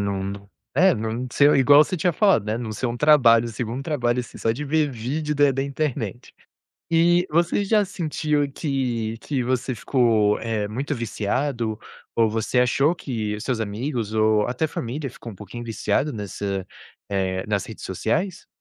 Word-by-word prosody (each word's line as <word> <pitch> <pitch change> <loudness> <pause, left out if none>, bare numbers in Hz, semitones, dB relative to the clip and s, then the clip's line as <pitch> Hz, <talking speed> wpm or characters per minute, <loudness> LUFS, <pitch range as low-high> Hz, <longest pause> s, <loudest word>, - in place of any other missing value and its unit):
não 100 0 -3 0.3
é 185 +6 +5
não 115 +3 -3
sei 145 0 +5
um - - +4
igual 145 +3 +7
você 185 - -3
tinha 175 +2 +1
falado 190 - +3
né. 110 +2 -1
Não 110 -3 -4
se 110 - -6
um 120 0 -3
trabalho, 120 -6 +5
segundo 120 +3 -4
trabalho, 125 -5 0
assim, 120 - -10
só 115 - +1
de 130 +7 -3
ver 150 0 +1
vídeo 145 +6 -3
da 145 -1 +4
da 135 +1 -1
internet. 135 -6 -3 0.6
E 175 +2 +4
você 170 +5 +2
já 210 0 +3
sentiu 150 -5 -1
que 125 -7 -2
que 140 -4 -2
você 130 0 -1
ficou, 110 -4 +2
eh, 110 -2 -2
muito 135 +6 -3
viciado 115 0 -2 0.4
ou 115 -1 +4
você 110 +3 -1
achou 135 +6 +3
que 110 -8 -4
seus 120 0 -2
amigos 110 +1 -3
ou 110 -1 +3
até 125 +6 0
família 140 0 -4
ficou 115 -2 -10
um - - -11
pouquinho 120 +4 -8
viciado 125 +5 -1
nessa 100 -2 -4 0.4
eh, 95 -2 -1
nas 100 -2 -1
redes 110 - -9
sociais? 115 - -2
120 Hz, 170 wpm, -23 LUFS, 110-145 Hz, 0.6 s, igual